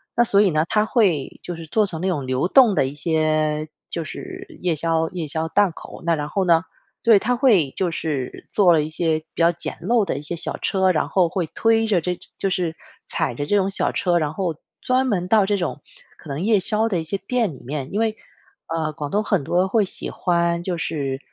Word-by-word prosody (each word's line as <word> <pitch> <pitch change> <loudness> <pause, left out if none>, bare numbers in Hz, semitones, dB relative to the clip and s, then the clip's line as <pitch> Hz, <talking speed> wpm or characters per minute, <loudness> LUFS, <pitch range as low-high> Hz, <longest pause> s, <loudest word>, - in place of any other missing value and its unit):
那 240 - +5
所 200 -3 +4
以 205 - +4
呢， 155 0 +1
他 215 -1 +2
会 190 - +1
就 175 - -5
是 165 -1 -9
做 215 +5 +2
成 165 -3 -5
那 190 - 0
种 150 -8 -1
流 130 +5 0
动 240 -1 +6
的 135 - +3
一 135 - -6
些 155 -1 0 0.2
就 165 - -3
是 375 - -8 0.2
夜 175 -3 +1
宵 160 +1 0
夜 170 -4 -5
宵 160 +2 -2
档 200 +2 +3
口， 165 - -11
那 170 - +3
然 150 0 -4
后 190 +3 0
呢 165 -2 +5 0.4
对， 225 -3 +6
他 245 +5 +1
会 210 - +3
就 185 -2 0
是 155 -5 -4
做 190 -4 +4
了 155 -2 +3
一 155 - -5
些 160 -1 +1 0.2
比 - - -3
较 170 +1 +5
简 170 - -6
陋 230 -3 +2
的 135 - -2
一 - - -8
些 170 +3 -5
小 - - -2
车 190 -1 0
儿， 185 - +6
然 155 - 0
后 180 -3 +3
会 180 -3 -2
推 225 0 +3
着 195 -5 +3
这 180 +2 -3 0.2
就 195 - -1
是 175 -4 -1 0.3
踩 - - -1
着 145 +4 -4
这 205 - +2
种 190 -1 +2
小 - - +1
车 175 -2 0
儿， 175 - +4
然 150 -2 -1
后 180 -5 -1 0.3
专 260 +1 +1
门 180 -5 0
到 210 -1 +4
这 205 0 +1
种 155 -5 -3 0.4
可 150 - -13
能 140 +3 -3
夜 215 -3 +4
宵 215 +4 +1
的 185 -6 0
一 - - -5
些 195 +5 -3
店 225 -1 -1
里 135 - -11
面。 135 +1 -5
因 205 - -1
为， 220 -1 +1 0.5
呃， 160 -2 -2
广 145 -2 -5
东 210 +2 0
很 190 -10 0
多 180 +6 +1
会 215 +1 +2
喜 190 - -5
欢， 170 -1 0
就 175 -1 -2
是 140 -5 -3
175 Hz, 260 characters per minute, -22 LUFS, 155-205 Hz, 0.5 s, 动